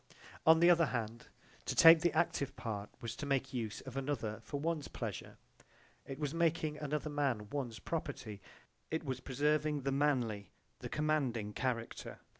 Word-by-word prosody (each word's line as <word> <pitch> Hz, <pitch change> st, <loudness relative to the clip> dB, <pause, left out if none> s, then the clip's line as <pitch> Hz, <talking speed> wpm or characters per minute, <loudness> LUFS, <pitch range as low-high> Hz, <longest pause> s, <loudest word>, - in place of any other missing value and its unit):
J.B.) -, -, -22 dB, 0.3 s
On 160 Hz, 0 st, +8 dB
the 170 Hz, +1 st, +7 dB
other 170 Hz, -2 st, +4 dB
hand, 115 Hz, -2 st, -4 dB, 0.4 s
to -, -, -2 dB
take 165 Hz, 0 st, +9 dB
the 175 Hz, -, +3 dB
active 140 Hz, -5 st, 0 dB
part 105 Hz, -3 st, -4 dB
was 115 Hz, 0 st, -4 dB
to 145 Hz, -, -5 dB
make 135 Hz, -1 st, 0 dB
use 115 Hz, -4 st, -3 dB
of 130 Hz, -1 st, -9 dB
another 135 Hz, -6 st, -2 dB
for 145 Hz, -, -5 dB
one's 160 Hz, -1 st, -1 dB
pleasure, -, -, -6 dB, 0.7 s
it 135 Hz, -, -6 dB
was 145 Hz, -1 st, -2 dB
making 165 Hz, -2 st, +1 dB
another 150 Hz, 0 st, -2 dB
man 135 Hz, -8 st, 0 dB
one's 130 Hz, -6 st, -3 dB
property, 135 Hz, -11 st, -5 dB, 0.5 s
it 160 Hz, +1 st, -2 dB
was 130 Hz, -4 st, -3 dB
preserving 150 Hz, +2 st, +1 dB
the 135 Hz, -, 0 dB
manly, 125 Hz, -8 st, +1 dB, 0.3 s
the -, -, -6 dB
commanding 135 Hz, -9 st, 0 dB
character. 120 Hz, -2 st, -3 dB
140 Hz, 165 wpm, -35 LUFS, 120-150 Hz, 0.7 s, take